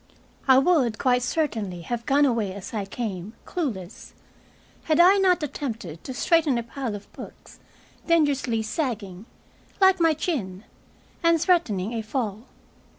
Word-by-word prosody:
I 260 -1 +7
would, 270 -7 +3
quite 250 -2 +2
certainly, 225 - -2
have 235 +4 -4
gone 285 +2 +4
away 225 -7 0
as 200 +2 -8
I 210 -3 -2
came, 200 -2 -5
clueless, 220 - -5 0.7
had 310 0 +2
I 370 +3 +7
not 365 -3 +3
attempted 225 - -5
to 260 - -6
straighten 315 -3 +2
a 235 - -2
pile 235 -1 -5
of 205 - -12
books, - - -12 0.5
dangerously 280 -9 +2
sagging 215 - -4 0.5
like 380 -1 +5
my 325 -2 +3
chin! 215 - -3 0.6
and 335 -1 +4
threatening 245 - +1
a 230 - -2
fall. 220 -1 -4
245 Hz, 140 wpm, -25 LUFS, 210-315 Hz, 0.7 s, I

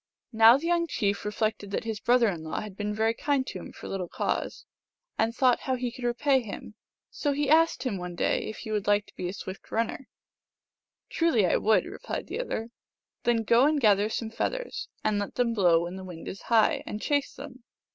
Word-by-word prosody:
Now 225 +2 +8
the 305 - -6
young 340 0 +2
chief 205 -9 -1
reflected 210 -1 -2
that 200 - -2
his 220 -2 -4
brother 245 0 +4
in 175 -6 -2
law 160 0 -4
had 210 -3 -8
been 210 +1 -3
very 220 +2 +1
kind 275 +2 0
to - - -6
him, - - -9
for - - -10
little 190 -2 -3
cause, - - -3 0.5
and 225 +1 +1
thought 250 +1 +3
how 260 - -1
he 250 -1 -3
could 245 +1 -7
repay 260 +3 +2
him. 215 -1 -8 0.4
So 290 -2 -1
he 290 0 0
asked 320 -5 +4
him 225 -8 -2
one 180 0 -6
day - - 0
if 215 - -7
he 220 - -7
would 210 -2 -1
like 205 0 +3
to - - -20
be 175 - -3
a - - -5
swift 190 -1 -8
runner. 230 +3 -2 0.5
" - - -64
Truly 320 - +3
I 175 - +3
would," 220 0 +3
replied - - -5
the - - -5
other. 235 - -3 0.3
" - - -60
Then 235 -2 +2
go 235 +5 +5
and 305 -1 +2
gather 210 -3 +4
some 225 0 -3
feathers, - - -3 0.2
and 210 -1 +1
let 205 - -4
them 240 -2 +1
blow 175 -6 +4
when 175 +2 -5
the 190 - -8
wind 175 -3 -9
is 195 - -6
high, 225 -2 +4
and 210 - -4
chase 285 +4 0
them. 265 -2 -10
225 Hz, 225 wpm, -27 LUFS, 205-255 Hz, 0.5 s, Now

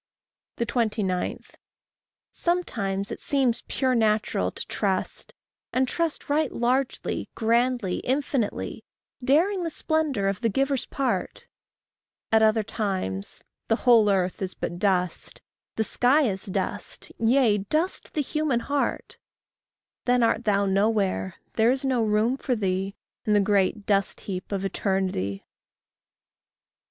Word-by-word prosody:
29. 220 -6 -1 0.9
Sometimes 205 - -1
it - - -5
seems 265 -5 +1
pure 260 -2 +1
natural 215 - +1
to - - -6
trust, 190 -3 -2 0.4
And 260 +1 +2
trust 335 +3 -2
right 295 0 +1
largely, 255 +2 -1
grandly, 235 -3 +1
infinitely, 265 -3 -2 0.4
Daring 345 +9 +3
the 335 - -1
splendour 310 -9 0
of 195 +1 -1
the 230 - +2
giver's 270 +4 0
part; 275 -1 -2 0.9
At 220 0 +5
other 220 0 +4
times, 190 - -3 0.2
the 225 - +3
whole 230 -4 +6
earth 185 -2 0
is 185 -1 -3
but 175 - -4
dust, 180 -3 0 0.4
The 220 - +1
sky 255 +7 +3
is 195 -7 -1
dust, 190 - -4
yea, 230 -2 +4
dust 310 - -2
the 305 - +2
human 295 -4 0
heart; 285 +2 -2 0.9
Then 245 -1 +3
art 230 +1 +1
thou 200 -1 +3
nowhere, 195 -2 +1 0.2
there 225 +1 +3
is 265 +2 0
no 255 -3 +2
room 215 +4 +2
for 255 -2 -1
thee 195 -1 -1 0.3
In 210 - +2
the 205 - +5
great 200 0 +1
dust 200 -2 +1
heap 185 -1 -6
of 195 -1 -1
eternity. 185 - -1
220 Hz, 125 wpm, -26 LUFS, 195-260 Hz, 0.9 s, whole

